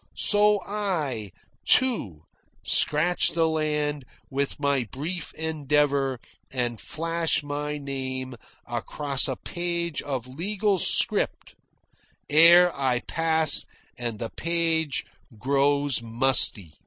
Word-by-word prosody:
So 210 0 +5
I, 160 - -3 0.3
too, 160 - +1 0.4
scratch 165 +4 +3
the 165 -1 +2
land 150 -2 -2 0.3
with 140 +1 -3
my 140 -3 0
brief 155 - -6
endeavour 145 -4 -1 0.3
and 120 -3 -4
flash 165 0 -2
my 145 +1 -4
name 130 -2 -5 0.3
across 135 +3 0
a 130 - -3
page 170 0 -3
of 130 -4 -5
legal 195 +8 -2
script - - +2 0.8
ere 170 +3 +6
I 130 -3 -1
pass 160 -1 +2 0.3
and 120 -3 -5
the 115 0 -6
page 165 -3 -1 0.3
grows 140 +1 +1
musty. 115 - +2
145 Hz, 100 wpm, -24 LUFS, 130-165 Hz, 0.8 s, ere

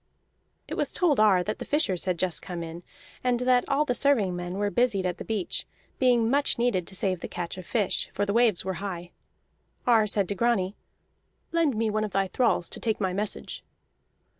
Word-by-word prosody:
It - - -6
was - - -1
told 320 -9 +2
Ar 200 -4 +5
that 215 +3 -4
the - - -4
fishers 245 - +1
had 180 -2 0
just 180 -1 0
come 175 -2 -5
in, 165 +1 -7 0.4
and 250 -1 +1
that 250 0 +3
all 285 +2 +2
the 250 - 0
serving 240 -10 +2
men 175 +1 -4
were 205 0 0
busied 230 -6 +2
at 180 -1 -2
the - - -4
beach, 215 -5 -2 0.3
being 245 -3 +4
much 280 +4 +2
needed 235 -8 +1
to 190 - -7
save 185 -1 -1
the - - -5
catch 175 +1 -5
of 185 -2 -9
fish, 210 -5 0
for 205 - -1
the 200 - -1
waves 230 -6 +3
were 190 - -1
high. 175 -3 -5 0.7
Ar 225 -3 +4
said 200 -2 +1
to - - +1
Grani: 205 -3 +1 0.8
"Lend 330 -6 +2
me 220 0 0
one 215 0 0
of 210 - -4
thy 195 0 +1
thralls 225 -8 +1
to - - -8
take 220 -2 -1
my 190 -3 0
message." 205 +2 -4
205 Hz, 210 wpm, -27 LUFS, 185-240 Hz, 0.8 s, Ar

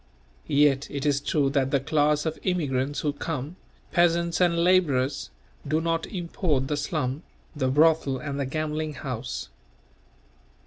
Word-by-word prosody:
Yet 140 -1 +3
it 140 0 -4
is 140 -1 +2
true 140 -2 +1
that 135 -2 +1
the 140 - +2
class 150 +2 +1
of 160 0 -2
immigrants 145 -6 -1
who 145 -2 0
come, 150 +1 -4 0.4
peasants 170 0 +2
and 170 -1 +3
labourers, 145 -7 +2 0.4
do 155 +2 +1
not 165 0 -1
import 170 -7 -1
the 150 - +1
slum, 145 -1 -2 0.3
the 135 -3 0
brothel 150 0 +3
and 140 +1 -5
the 140 - -1
gambling 155 +1 -3
house. 125 - -5
150 Hz, 140 wpm, -26 LUFS, 135-165 Hz, 0.4 s, Yet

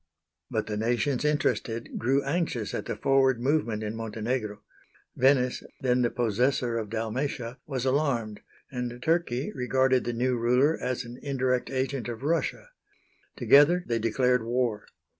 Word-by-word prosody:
But - - -1
the 105 0 -3
nations 120 +5 0
interested 130 -6 -1
grew 135 +4 +2
anxious 140 - -2
at - - -3
the - - -2
forward 135 -2 +3
movement 120 -5 0
in 105 +1 -4
Montenegro. 110 -1 -3 0.5
Venice, 130 -1 +3 0.2
then 125 -1 +2
the 120 - +2
possessor 120 +1 0
of 110 -2 -5
Dalmatia, 115 +3 -3
was 135 -3 -3
alarmed, 130 -6 0 0.3
and 125 -2 -4
Turkey 160 -6 0
regarded 130 -1 +2
the 120 - -1
new 125 +2 +1
ruler 125 +7 +3
as 125 -1 -2
an 120 +2 -10
indirect 130 -3 0
agent 130 -1 -2
of 120 +2 -6
Russia. 165 - -1 0.7
Together 160 +6 +5
they 115 -1 -1
declared 125 +2 +2
war. 115 -2 -1
125 Hz, 140 wpm, -27 LUFS, 115-135 Hz, 0.7 s, Together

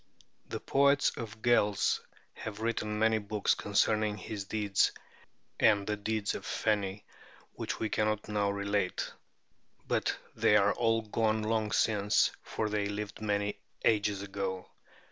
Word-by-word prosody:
The - - -4
poets 140 +1 +3
of 110 -3 -6
the - - -17
Gaels 105 -4 +3 0.3
have 105 -1 -7
written 110 -2 -1
many 110 0 +3
books 105 0 +1
concerning 105 +1 +1
his 100 0 -6
deeds 105 -2 +1 0.7
and 100 -2 +4
the 105 - -1
deeds 105 0 -1
of - - -5
the - - -10
Feni, 100 -2 -1 0.5
which - - -4
we 110 - 0
cannot 110 0 0
now 105 -1 +1
relate; 100 -1 -1 0.8
but - - 0 0.2
they 105 - +4
are 100 0 +4
all 115 -1 +1
gone 110 0 0
long 110 -1 0
since, 105 -2 +3
for 110 - -3
they 105 -1 0
lived 105 +1 -5
many 105 -1 -1 0.3
ages 105 -2 +2
ago. 95 -2 -4
105 Hz, 145 wpm, -31 LUFS, 100-110 Hz, 0.8 s, and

